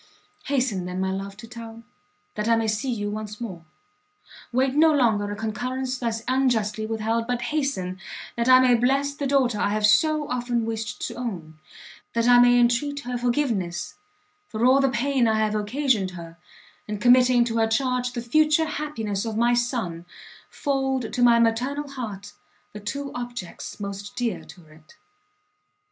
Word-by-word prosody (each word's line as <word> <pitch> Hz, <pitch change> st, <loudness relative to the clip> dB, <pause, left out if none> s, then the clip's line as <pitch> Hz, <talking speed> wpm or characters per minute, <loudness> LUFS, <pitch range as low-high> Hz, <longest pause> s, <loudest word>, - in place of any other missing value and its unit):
Hasten 250 Hz, -10 st, 0 dB
then, 180 Hz, +1 st, -4 dB
my 190 Hz, 0 st, 0 dB
love, 195 Hz, +1 st, -5 dB
to 230 Hz, +1 st, -10 dB
town, 230 Hz, 0 st, -10 dB, 0.5 s
that 210 Hz, +1 st, -3 dB
I 230 Hz, -, +5 dB
may 225 Hz, -1 st, 0 dB
see 220 Hz, +5 st, -1 dB
you 205 Hz, -3 st, -3 dB
once 210 Hz, 0 st, -6 dB
more! 190 Hz, -8 st, -7 dB, 0.9 s
wait 260 Hz, +2 st, +1 dB
no 315 Hz, +2 st, +5 dB
longer 225 Hz, -8 st, +2 dB
a -, -, -3 dB
concurrence 250 Hz, +4 st, -3 dB
thus 230 Hz, -2 st, -2 dB
unjustly 225 Hz, -5 st, +1 dB
with 225 Hz, -1 st, -3 dB
held, 230 Hz, +1 st, 0 dB
but 245 Hz, -1 st, -1 dB
hasten, 190 Hz, -12 st, -2 dB, 0.4 s
that 235 Hz, +1 st, 0 dB
I 255 Hz, 0 st, +9 dB
may 255 Hz, -1 st, +5 dB
bless 270 Hz, +4 st, +2 dB
the 285 Hz, -1 st, -3 dB
daughter 260 Hz, -6 st, +2 dB
I 200 Hz, -, +1 dB
have 210 Hz, 0 st, +1 dB
so 305 Hz, +6 st, +3 dB
often 245 Hz, -2 st, -1 dB
wished 225 Hz, -1 st, -4 dB
to -, -, -5 dB
own! 175 Hz, -11 st, -6 dB, 0.5 s
that 230 Hz, 0 st, +1 dB
I 245 Hz, 0 st, +7 dB
may 245 Hz, 0 st, +6 dB
entreat 255 Hz, +4 st, +1 dB
her 250 Hz, -2 st, -5 dB
forgiveness 240 Hz, -8 st, -1 dB, 0.5 s
for 220 Hz, +2 st, -1 dB
all 260 Hz, +2 st, +6 dB
the 270 Hz, -, +3 dB
pain 255 Hz, 0 st, +1 dB
I 220 Hz, -1 st, +2 dB
have 215 Hz, -1 st, +1 dB
occasioned 215 Hz, -1 st, 0 dB
her, 165 Hz, -1 st, -9 dB, 0.5 s
and 210 Hz, -1 st, -4 dB
committing 245 Hz, +1 st, +5 dB
to 230 Hz, -1 st, -2 dB
her 225 Hz, 0 st, +3 dB
charge 250 Hz, +1 st, 0 dB
the 240 Hz, -1 st, -4 dB
future 310 Hz, +5 st, +3 dB
happiness 255 Hz, -10 st, -3 dB
of 225 Hz, -2 st, -4 dB
my 240 Hz, +1 st, +3 dB
son, 235 Hz, -9 st, -2 dB, 0.4 s
fold 270 Hz, -4 st, -1 dB
to 245 Hz, -, -1 dB
my 240 Hz, -1 st, +6 dB
maternal 250 Hz, +6 st, +1 dB
heart 215 Hz, -7 st, -7 dB, 0.4 s
the 210 Hz, -, -7 dB
two 275 Hz, +7 st, -5 dB
objects 240 Hz, -8 st, -7 dB
most 200 Hz, 0 st, -6 dB
dear 235 Hz, -6 st, -2 dB
to 175 Hz, -3 st, -15 dB
it! 155 Hz, 0 st, -19 dB
235 Hz, 170 wpm, -24 LUFS, 210-255 Hz, 0.9 s, I